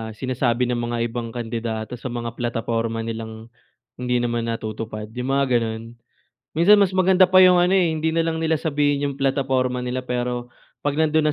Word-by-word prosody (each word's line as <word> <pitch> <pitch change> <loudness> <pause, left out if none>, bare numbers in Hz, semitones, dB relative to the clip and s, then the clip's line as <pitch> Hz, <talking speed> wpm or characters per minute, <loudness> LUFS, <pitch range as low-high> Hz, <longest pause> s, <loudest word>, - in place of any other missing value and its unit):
sinasabi 125 0 0
ng 120 - -1
mga 120 0 -2
ibang 115 -1 -5
kandidato, 115 0 -4
sa 130 - -5
mga 120 -1 -4
plataporma 115 -1 -2
nilang 110 0 -7 0.4
hindi 125 0 -1
naman 120 -1 -1
natutupad, 110 -1 -5
'yong 125 +2 -3
mga 140 0 +3
gano'n. 110 -1 -3 0.7
Minsan 170 +7 +6
mas 200 -2 +3
maganda 185 0 +5
pa 185 +1 +5
'yong 185 -1 +7
ano, 175 +1 +3
eh, 185 -3 +4
hindi 160 0 -1
na 165 - +1
lang 165 0 0
nila 160 -1 +1
sabihin 145 -2 +1
'yong 140 - -5
plataporma 130 -2 0
nila, 125 +1 -3
pero 120 -1 -3 0.3
'pag 145 +1 0
nando'n 155 -1 +2
125 Hz, 175 wpm, -22 LUFS, 115-155 Hz, 0.7 s, yong